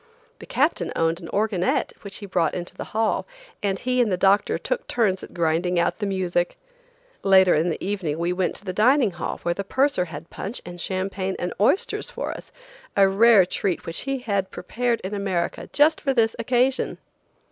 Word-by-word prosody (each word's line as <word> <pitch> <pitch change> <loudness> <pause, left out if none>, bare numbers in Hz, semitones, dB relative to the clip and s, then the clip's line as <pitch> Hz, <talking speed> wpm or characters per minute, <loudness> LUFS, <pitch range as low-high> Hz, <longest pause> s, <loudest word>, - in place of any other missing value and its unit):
The - - -11
captain - - +1
owned 165 +1 +1
an 165 - -8
organette 200 -3 0
which 200 -2 -7
he 205 - -7
brought 175 -5 0
into 175 -1 -5
the - - -7
hall, 220 0 0 0.3
and 195 -2 0
he 250 +4 +1
and 225 -4 +1
the 185 - +1
doctor 195 +2 +3
took - - -3
turns 200 -6 +1
at - - -9
grinding 170 +1 0
out 170 +4 +1
the 205 - -1
music. 180 -2 -1 0.6
Later 190 -2 +6
in 160 +3 +2
the 165 - -4
evening 185 -7 -2
we 170 +2 0
went 180 -1 -1
to 205 - -12
the 185 - -3
dining 240 +2 +4
hall 170 - -4
where 170 - +1
the 200 - -4
purser 260 -2 +1
had 160 0 -9
punch 220 - -5
and 175 0 -8
champagne 190 0 -2
and 175 - -3
oysters 290 - +1
for - - -4
us, - - -10 0.5
a 195 - +7
rare 205 0 +6
treat 185 0 -2
which 165 - -3
he 275 -1 -2
had 200 -6 -1
prepared 240 -1 -2
in 190 +2 -5
America 195 -4 -2
just 305 +2 +4
for 270 -2 0
this 225 -2 +2
occasion. 250 +3 +1
195 Hz, 195 wpm, -24 LUFS, 175-225 Hz, 0.6 s, a